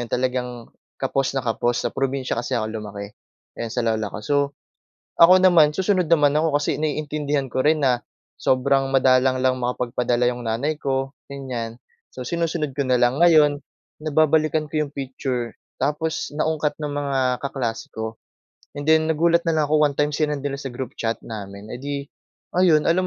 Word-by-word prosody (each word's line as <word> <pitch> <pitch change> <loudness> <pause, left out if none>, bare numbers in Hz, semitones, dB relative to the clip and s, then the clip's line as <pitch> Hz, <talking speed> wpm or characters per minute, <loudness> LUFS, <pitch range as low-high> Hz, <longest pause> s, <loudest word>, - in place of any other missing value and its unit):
'yon - - -24
talagang 125 0 -1 0.5
kapos 135 -1 0
na - - +2
kapos. 120 +1 0
Sa - - +2
probinsya 135 -1 -1
kasi 120 - -6
ako 110 -2 -1
lumaki, 105 -1 -7 0.5
yan 115 - -4
sa 125 - -1
lola 110 -2 0
ko. - - -6
So, 145 +4 +1 0.8
ako 175 +2 +9
naman 170 -5 +6
susunod 190 -3 +1
naman 150 -4 +4
ako 155 -1 +2
kasi 145 - 0
naiintindihan 150 -2 -1
ko 130 - 0
rin 155 +1 +3
na 125 -2 +2 0.4
sobrang 135 +1 +2
madalang 130 0 +4
lang 130 0 +2
makapagpadala 125 0 0
yung 125 0 -6
nanay 140 +8 -1
ko, 135 -1 -1 0.2
ganyan. 125 -5 -5 0.4
So, 130 - -6
sinusunod 165 0 -1
ko 130 - -4
na 130 - +4
lang. 120 +3 +2
Ngayon, 155 -4 +5 0.4
nababalikan 155 0 +2
ko 155 - +1
yung 140 - -15
picture, 130 -3 -3 0.3
tapos 155 +2 -1
naungkat 155 0 -1
ng 150 - -2
mga 135 -3 0
kaklase 125 -5 -3
ko, 110 0 -5 0.6
and 145 - -4
then 160 0 +4
nagulat 170 +2 +3
na 165 - +2
lang 150 -2 +1
ako 155 -1 +5
one 140 - -6
time 150 0 +2
sinend 150 -2 -1
nila 140 -1 -2
sa 135 - -5
group 130 0 -5
chat 115 0 0
namin. 100 -1 -8
Edi 140 +3 -5 0.4
ayun, 170 -4 +4
alam 185 +2 +2
140 Hz, 170 wpm, -23 LUFS, 125-155 Hz, 0.8 s, ako